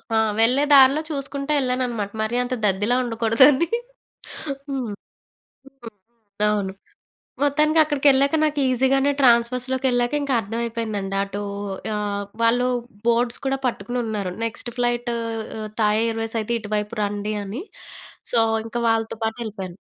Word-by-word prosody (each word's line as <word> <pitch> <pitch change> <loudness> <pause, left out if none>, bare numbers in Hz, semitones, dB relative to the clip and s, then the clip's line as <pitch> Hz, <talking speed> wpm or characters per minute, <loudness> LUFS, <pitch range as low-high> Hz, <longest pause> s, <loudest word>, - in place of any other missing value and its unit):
ఆ! - - +4 0.2
వెళ్ళే 250 +5 +4
దారిలో 275 +2 +7
చూసుకుంటా 280 0 -4
ఏళ్ళానన్నమాట. 250 -5 -1
మరి 220 +2 -1
అంత 250 +1 -4
దద్దిలా 205 +4 +2
ఉండకూడదని. 240 +6 +4 1.0
హ్మ్. 260 -5 -3 0.8
హ్మ్. 270 -4 -12 0.6
అవును. 205 -2 0 0.7
మొత్తానికి 305 +3 +3
అక్కడికెళ్ళాక 280 -1 +3
నాకు 300 -1 +1
ఈజీ 255 +1 +2
గానే 275 +1 +3
ట్రాన్స్‌ఫర్స్‌లోకెళ్ళాక 250 +1 +2
ఇంకా 280 -2 -1
అర్థమైపోయిందండి. 220 -2 -3
అటు 200 +1 -5 0.5
ఆహ్, 205 -1 -2 0.2
వాళ్ళు 240 +2 +3 0.4
బోర్డ్స్ 235 0 +1
కూడా 270 0 +1
పట్టుకుని 245 +1 -3
ఉన్నారు. 205 -4 -3
నెక్స్ట్ 230 +1 -5
ఫ్లైటు 240 -1 0 0.7
థాయ్ 210 0 +3
ఎయిర్వేస్ 225 0 -3
అయితే 215 +2 -3
ఇటువైపు 210 +1 -3
రండి 205 +1 -2
అని. 205 +9 -5 0.7
సో, 235 - +4 0.3
ఇంక 225 +1 -5
వాళ్ళతో 225 0 0
పాటు 220 0 -2
ఎళ్ళిపోయాను. 190 -5 -7
235 Hz, 120 wpm, -22 LUFS, 215-265 Hz, 1.0 s, దారిలో